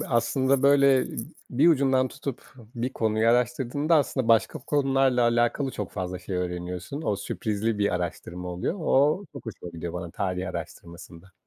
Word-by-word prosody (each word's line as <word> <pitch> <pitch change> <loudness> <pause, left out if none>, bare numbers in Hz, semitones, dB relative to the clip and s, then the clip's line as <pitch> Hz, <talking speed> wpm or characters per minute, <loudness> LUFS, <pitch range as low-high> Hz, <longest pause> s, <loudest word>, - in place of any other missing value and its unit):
bir, 120 - 0
aslında, 130 +3 +2
böyle, 140 -2 +5 0.5
bir 140 +7 +4
ucundan 135 -4 +3
tutup 135 -1 -7 0.2
bir 125 +3 -2
konuyu 110 0 +1
araştırdığında 125 +6 +1
aslında 130 -4 0
başka 115 -1 +3
konularla 135 -3 +2
alakalı 120 +3 +2
çok 105 -6 -5
fazla 90 -2 -4
şey 95 0 -5
öğreniyorsun. 90 - -4
O 105 - 0
sürprizli 105 +2 -2
bir 100 -3 +1
araştırma 90 0 -4
oluyor. 90 - -2
O 155 +4 +2
çok 140 -4 -10
hoşuma 90 -5 -7
gidiyor 85 0 -6
bana 85 -1 -5
tarih 95 0 -2
araştırmasında. 85 +1 -9
115 Hz, 150 wpm, -26 LUFS, 90-135 Hz, 0.5 s, böyle